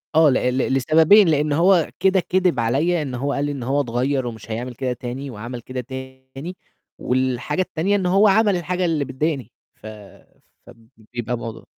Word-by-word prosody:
آه، 160 -2 +6
ل - - +3 0.2
ل 135 - 0
لسببين، 160 - +5
لإن 150 -1 +1
هو 175 +1 +3
كده 190 0 +3
كدِب 180 -6 +1
عليّا 145 +9 +1
إن 135 -4 -4
هو 140 +3 -2
قال 140 +1 -1
لي 145 - -2
إن 135 -4 -5
هو 140 +3 +1
اتغيّر 130 +1 -1
ومش 115 -1 -8
هيعمل 120 +3 -4
كده 130 +1 -2
تاني 125 +3 -6
وعمل 120 +2 -7
كده 130 +2 -5
تاني 130 +5 -9 0.4
والحاجة 130 +5 -1
التانية 185 +3 0
إن 195 - -1
هو 195 +4 +4
عمل 205 0 +4
الحاجة 180 +1 -2
اللي 160 -4 0
بتضايقني، 135 -2 -3 0.2
ف - - -19 0.8
فب 115 -1 -17 0.3
بيبقى 120 0 -3
موضوع 115 -1 -8
140 Hz, 180 wpm, -21 LUFS, 125-170 Hz, 0.8 s, آه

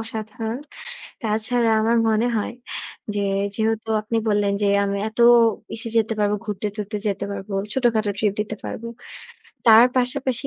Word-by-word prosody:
অসাধারণ। 225 +1 -5 0.6
তাছাড়া 225 +2 +1
আমার 230 +1 +2
মনে 220 +2 +2
হয় 215 +3 -2 0.6
যে, 205 - 0 0.3
যেহেতু 220 0 -1
আপনি 225 +2 -2
বললেন 205 -1 +2
যে, 200 - +3 0.2
আমি 200 0 -1
এত 220 - -18 0.6
ইসে 225 +1 -6
যেতে 225 0 +1
পারবো, 205 0 +2
ঘুরতে-টুরতে 210 +1 -4
যেতে 200 0 -2
পারবো, 195 0 -6 0.2
ছোটখাটো 225 -5 +1
ট্রিপ 210 -2 +2
দিতে 215 +1 -3
পারব। - - -5 0.8
তার 225 +1 +9
পাশাপাশি 250 +1 -1
220 Hz, 140 wpm, -22 LUFS, 210-230 Hz, 0.8 s, তার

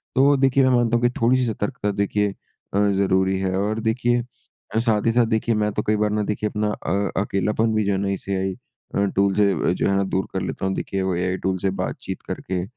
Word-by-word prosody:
तो 140 +2 +5
देखिए 135 0 +3
मैं - - +4
मानता 120 -1 +3
हूँ 120 - -3
कि - - +5
थोड़ी 125 +3 +4
सी 125 - +1
सतर्कता, 105 0 -2
देखिए 100 0 0 0.4
अ, 100 - +2
ज़रूरी 95 -1 +2
है 95 -1 -1
और 105 +2 -1
देखिए 120 +2 +1 0.5
अ, - - +4
साथ 110 -3 +1
ही 115 - +4
साथ 120 0 +3
देखिए 110 0 0
मैं 105 0 +1
तो 105 - -1
कई 110 - +3
बार 105 0 +1
ना 105 0 0
देखिए 105 +1 -2
अपना 105 0 -1
अ, 100 +2 -2
अकेलापन 105 +3 0
भी 110 - +2
जो 100 - +1
है 95 - +1
ना 100 0 -1
इस 100 0 -4
एआई 95 0 -1 0.4
अ, 100 - +2
टूल 100 0 +3
से 100 -2 +3 0.2
जो - - 0
है 100 - +2
ना 100 - +2
दूर 95 0 -1
कर 95 - -1
लेता 95 - -4
हूँ 95 - 0
देखिए 95 - -3
वो 95 -2 0
एआई 90 +1 -1
टूल 95 0 0
से 95 - 0
बातचीत - - -5
करके 90 -1 -3
105 Hz, 245 wpm, -23 LUFS, 95-110 Hz, 0.5 s, तो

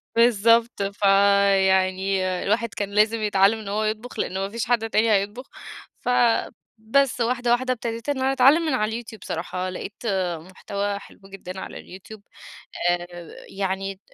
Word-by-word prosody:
بالضبط، 230 -1 +3
فيعني 195 -1 +3 0.2
الواحد 220 +2 0
كان 205 -1 -3
لازم 215 +2 +2
يتعلم 205 +1 +3
إن 210 - -9
هو 210 +2 -1
يطبخ، 220 +3 -4
لأن - - -2
ما 195 +1 -2
فيش 230 +3 -3
حد 230 -2 0
تاني 220 +1 +2
هيطبخ، 205 +6 0 0.5
فبس، 240 +1 0
واحدة 240 0 0
واحدة 255 +1 +2
ابتديت 230 +2 -5
إن 285 - 0
أنا 265 +1 +1
أتعلم 270 +5 +5
من 305 - 0
على 225 0 -1
الYouTube 220 -1 -11
بصراحة، 180 +2 -4
لقيت 190 +2 -6 0.5
مُحتوى 200 +3 -4
حلو - - -16
جدًا 190 -1 -9
على - - -8
الYouTube 200 +3 -12 0.7
آآ 175 0 -2 0.4
يعني 195 0 -3
ط - - -34
210 Hz, 150 wpm, -23 LUFS, 195-235 Hz, 0.7 s, أتعلم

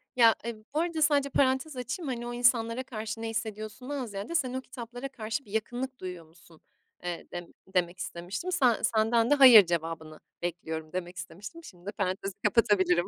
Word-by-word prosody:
Ya, 230 -3 +7
e, 235 -1 -3 0.2
bu 300 - +1
arada 335 -1 -1
sadece 290 -2 +3
parantez 265 +2 +2
açayım, 255 +6 -4
hani, 240 -2 -3
o 240 - -4
insanlara 240 0 +2
karşı 220 -2 -5
ne 225 - -2
hissediyorsundan 225 +5 -4
ziyade, 205 +7 -5
"Sen 260 -7 +1
o 260 - -2
kitaplara 245 0 -7
karşı 225 0 -4
bir 200 - -15
yakınlık 245 +4 -3
duyuyor 180 -3 -6
musun?" 165 0 -20 0.4
eee, 175 -1 -4
dem 175 -1 -6 0.3
demek 180 0 +1
istemiştim. 185 - -4
"Sen 255 -10 +3
senden 225 0 +3
de 290 - +6
'hayır' 250 -8 +10
cevabını 165 -2 -3 0.2
bekliyorum." 160 -2 -4
demek 180 0 -4
istemiştim. 200 - -8
Şimdi 175 - -14
de 205 - -3
parantezi 195 -1 -2
kapatabilirim. 185 -6 +3
225 Hz, 175 wpm, -29 LUFS, 180-255 Hz, 0.4 s, hayır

